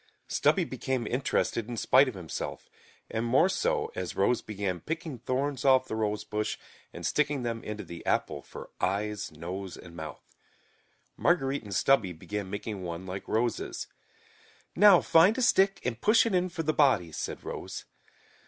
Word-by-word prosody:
Stubby - - +2
became 130 -3 -2
interested 120 -2 0
in 120 - -4
spite 130 +5 +5
of 130 - -4
himself, 85 -5 -6 0.4
and 110 - -1
more 130 +9 +4
so, 450 - 0
as - - -4
Rose 125 - +2
began 100 -4 -3
picking 160 - -5
thorns 130 +3 -2
off 130 -1 +5
the - - -3
rosebush 105 0 -2 0.3
and - - -7
sticking 145 -3 +1
them 115 -1 -3
into 105 0 -5
the 85 - -9
apple - - 0
for - - -11
eyes, 105 +2 -1
nose 90 +4 -6
and 85 -2 -12
mouth. 80 -2 -7 0.9
Marguerite 140 -5 +2
and 100 -3 -6
Stubby 110 -9 +3
began 100 +4 -5
making 100 0 -5
one 85 0 -5
like 95 +1 -6
Rose's. 115 +1 -1 0.9
"Now, 200 -2 +8
find 185 +8 +5
a - - 0
stick 195 -3 +4
and 120 -2 -2
push 225 +2 +5
it 230 - 0
in 180 0 +2
for 165 -1 -4
the 155 0 +1
body," 130 - +3
said - - -5
Rose. - - -6
115 Hz, 160 wpm, -29 LUFS, 100-150 Hz, 0.9 s, Now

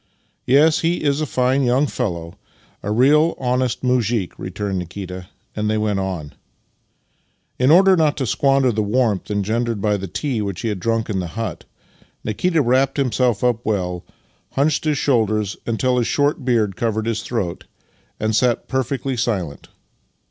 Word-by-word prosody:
" - - -45
Yes, 150 +5 +5
he 170 0 0
is 145 0 +1
a 155 - -1
fine 130 +2 +1
young 130 +3 +3
fellow, 85 - -3 0.5
a 100 - -4
real 150 +8 +4
honest 125 -1 -1
muzhik," 120 -6 +1
returned 95 0 -3
Nikita, 90 +1 -7 0.3
and 105 0 -1
they 110 - +1
went 105 -2 0
on. 90 -6 -4 1.3
In 130 +1 +3
order 190 +4 +7
not 155 -4 +2
to 135 - -1
squander 135 +4 +2
the 110 -1 -1
warmth 105 -2 0
engendered 110 +2 -1
by 105 0 +1
the 95 0 -5
tea 110 - -2
which 100 -3 -4
he 115 - -1
had 105 -3 -3
drunk 115 +3 0
in 95 - -1
the 90 - -3
hut, 115 -1 -4 0.6
Nikita 160 - +1
wrapped 130 +3 +2
himself 125 -4 +1
up 120 -1 +1
well, 90 -4 -2 0.5
hunched 145 +3 +1
his 150 -2 +1
shoulders 110 -7 +1
until 125 +2 +1
his 120 - 0
short 145 -1 +1
beard 110 -6 +1
covered 110 -1 -1
his 115 -1 -1
throat, 100 -8 -3 0.5
and 110 0 0
sat 120 +1 +1
perfectly 130 0 -2
silent. 95 - -2
115 Hz, 165 wpm, -20 LUFS, 105-130 Hz, 1.3 s, order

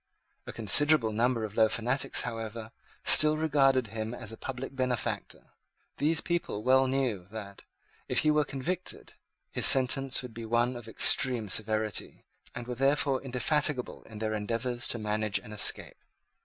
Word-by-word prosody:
A - - -5
considerable 115 +2 +3
number 115 +1 0
of 105 -1 -6
low 110 -1 +4
fanatics, 125 +5 -1
however, 115 -1 -6 0.3
still 155 0 +7
regarded 135 -5 +2
him 110 +1 -4
as - - -7
a - - -8
public 135 +3 -7
benefactor. 125 -2 -4 0.5
These 155 +3 +1
people 170 -11 -3
well 130 +2 +4
knew 130 -8 -1
that, 100 -2 -9 0.5
if - - +2
he 155 - +5
were 150 0 +2
convicted, 165 +7 -5 0.4
his - - +2
sentence 135 0 +2
would 125 -2 -9
be 115 +1 -8
one 120 +2 0
of 120 -2 -9
extreme 115 0 +3
severity, 110 +1 -2 0.3
and 120 - -6
were 125 - -5
therefore 135 +1 +1
indefatigable 135 +1 -2
in 110 - -12
their 110 0 -3
endeavours 115 +3 -2
to - - -1
manage 105 -1 -1
an 110 - -9
escape. 105 - -1
120 Hz, 155 wpm, -29 LUFS, 110-135 Hz, 0.5 s, still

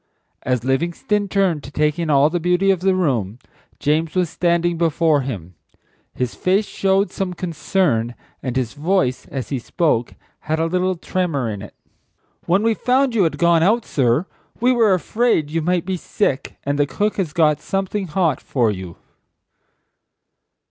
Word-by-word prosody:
As 125 -3 -1
Livingstone 170 +10 0
turned 190 -6 +1
to - - -8
take 150 +2 0
in 165 -2 -1
all 145 +1 +4
the 175 - 0
beauty 180 +3 +2
of 190 - 0
the 190 +1 +2
room, 120 - 0 0.4
James 155 +3 0
was 180 -3 +1
standing 170 0 +1
before 165 -2 +2
him. 100 -10 -6 0.6
His 125 -2 -2
face 195 +3 +1
showed 195 +1 +1
some 185 -2 -3
concern, 160 - 0 0.3
and 125 -2 -4
his 125 -3 -1
voice, 150 -4 0
as 130 -3 -5
he 135 - -2
spoke, 120 -2 0 0.2
had 155 +1 -2
a 165 - +1
little 185 +2 0
tremor 165 -7 -2
in 105 -3 -4
it. 105 - -11 0.7
"When 185 +5 +3
we 225 0 +3
found 255 +3 +1
you 205 -6 +3
had 160 - -1
gone 170 -1 +4
out, 220 +7 +2
sir, 130 +4 +1 0.3
we 245 +2 +3
were 225 -5 +4
afraid 185 -5 0
you 165 +1 0
might 175 +1 0
be 190 0 -2
sick, 155 -6 -2
and 145 +1 -1
the 145 - +3
cook 210 +7 -1
has 180 -6 -1
got 150 -2 +2
something 195 0 -2
hot 165 0 0
for 120 -5 +1
you?" 95 -4 -7
165 Hz, 170 wpm, -20 LUFS, 140-190 Hz, 0.7 s, all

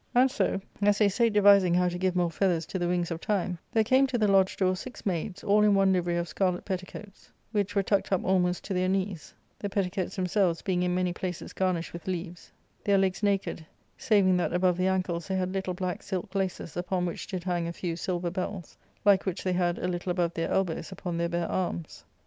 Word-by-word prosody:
And 255 +1 +5
so, 260 - 0 0.2
as 205 0 +4
they 210 -2 +4
sate 230 +3 +2
devising 200 -4 +6
how 180 0 +3
to 175 0 -2
give 185 -1 0
more 175 -2 +1
feathers 170 -2 +1
to 185 - -4
the 175 - 0
wings 175 -1 0
of 165 0 -4
Time,* 185 -4 -1
there 225 -2 +3
came 260 +4 +4
to 260 -2 -1
the 215 -2 +2
lodge 195 -1 +3
door 185 -1 +2
six 250 +7 -9
maids, 185 +1 -2
all 205 +1 +4
in 210 -1 +5
one 195 -1 +4
livery 175 -1 0
of 170 0 -1
scarlet 180 0 -1
petticoats, 190 +1 -7 0.2
which 205 -2 -1
were 200 - +3
tucked 200 +1 0
up 190 - +1
almost 180 -1 +1
to 195 - -4
their 185 0 +1
knees, 190 -3 -2 0.2
the 205 - -3
petticoats 190 -2 -2
themselves 185 -2 +1
being 180 -2 0
in 180 0 +1
many 180 -1 0
places 180 -1 -5
garnished 180 -3 -1
with 170 +1 -9
leaves, 175 -1 -5 0.3
their 200 -1 +3
legs 190 0 +1
naked, 200 -5 0 0.3
saving 195 -4 +3
that 175 - -1
above 180 0 +3
the 185 +1 +1
ankles 180 -2 -1
they 190 - -1
had 185 0 -1
little 190 -2 -2
black 185 -1 -3
silk 190 +1 -4
laces, 190 -4 -3
upon 180 0 -1
which 170 - -5
did 185 -2 -4
hang 175 -2 -1
a - - -3
few 170 -1 -4
silver 175 0 -2
bells, 185 -1 -5 0.3
like 200 -1 +4
which 185 - -2
they 185 - 0
had 175 -1 +1
a - - -2
little 175 0 -3
above 175 -1 0
their 165 0 -2
elbows 185 -2 -1
upon 180 -2 -5
their 170 0 0
bare 170 0 -1
arms. 175 -3 -3
185 Hz, 225 wpm, -28 LUFS, 175-195 Hz, 0.3 s, devising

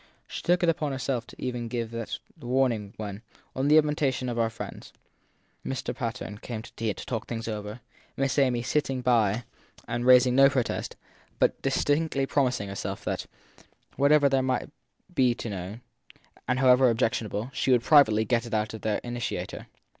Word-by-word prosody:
She - - -6
took 175 +1 +2
upon 155 -4 +1
herself 130 -2 -2
even 125 -2 -3
to - - -5
give 115 -1 -4
him 115 - -3
that 115 - -4 0.2
warning 120 -6 0
when, 105 -1 -6 0.3
on 130 +2 0
the 150 +1 +6
invitation 150 -4 +1
of 120 -1 -2
our 115 -1 +2
friends, 115 - -9 0.7
Mr. 135 - -3
Patten 115 -3 -5
came 110 -2 -6
to 120 - -13
tea 115 -1 -2
and 105 - -3
to - - -7
talk 115 -3 -4
things 115 -1 -4
over; 105 +1 -5 0.4
Miss 135 +1 +1
Amy 125 -3 +2
sitting 135 -1 0
by 120 -3 +2 0.4
and 120 0 -2
raising 125 0 +6
no 135 0 +7
protest, 130 -4 -2 0.4
but - - +1
distinctly 145 +1 +1
promising 130 -7 0
herself 100 - -5
that, - - -3 0.7
whatever 145 +1 +5
there 135 -1 +2
might 130 -1 -1 0.4
be 130 -6 +3
to 115 - -5
be 100 - -4
known, 95 +6 -7 0.7
and 125 - +1
however 130 0 +5
ob 115 - 0
jectionable, 115 0 -1
she 135 - -1
would 120 -2 +4
privately 110 -8 +5
get 120 +2 0
it 115 - -2
out 110 0 -1
of 110 - -7
their 110 -1 0
initiator. 120 -1 -4
125 Hz, 180 wpm, -27 LUFS, 115-135 Hz, 0.7 s, no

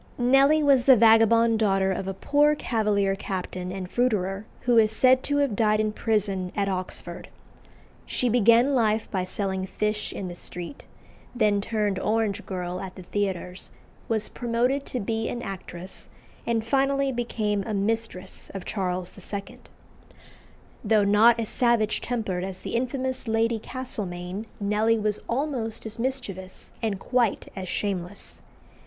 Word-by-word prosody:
Nelly 275 +5 +4
was 275 -4 +4
the 265 - +8
vagabond 225 0 +5
daughter 195 -3 +2
of 190 0 -3
a 195 - -3
poor 295 +7 +3
Cavalier 210 -7 +1
captain 185 -2 -4
and 190 -1 -5
fruiterer, 200 -3 0 0.2
who 245 -2 +4
is 215 -1 +4
said 255 +3 +4
to 285 0 +1
have 280 -7 +1
died 215 0 +3
in 215 0 +1
prison 200 -4 -1
at 200 -1 0
Oxford. 185 -1 -5 0.8
She 250 - 0
began 235 +3 +5
life 220 -3 +1
by 190 -3 0
selling 190 0 -3
fish 210 +2 -2
in 190 - -5
the 175 - -6
street, 175 +7 -8 0.5
then 210 -4 +2
turned 210 -3 -1
orange 215 -1 0
girl 180 -1 -4
at 190 -1 -7
the 185 - -9
theatres, 185 -1 -3 0.4
was 220 -2 0
promoted 245 +3 -1
to 250 - -3
be 225 +1 -2
an 240 0 -4
actress, 190 -2 -7 0.4
and 230 -1 0
finally 275 +2 +2
became 220 -4 -1
a 220 - -2
mistress 200 -2 -3
of 195 - -5
Charles 180 -3 -2 0.2
II. 200 -1 -5 1.2
Though 215 -1 +3
not 220 +4 +5
as 225 - -1
savage 235 -3 +2
tempered 215 -7 -2
as 190 -1 -6
the - - -6
infamous 255 +1 -2
Lady 225 +1 +1
Castlemaine, 205 -5 -4
Nelly 210 +2 +2
was 210 -1 0
almost 240 -4 -2
as 220 +1 -7
mischievous, 220 -8 -4
and 215 -4 -1
quite 245 -2 0
as 185 -2 -5
shameless. 195 -1 -3
215 Hz, 150 wpm, -26 LUFS, 195-235 Hz, 1.2 s, the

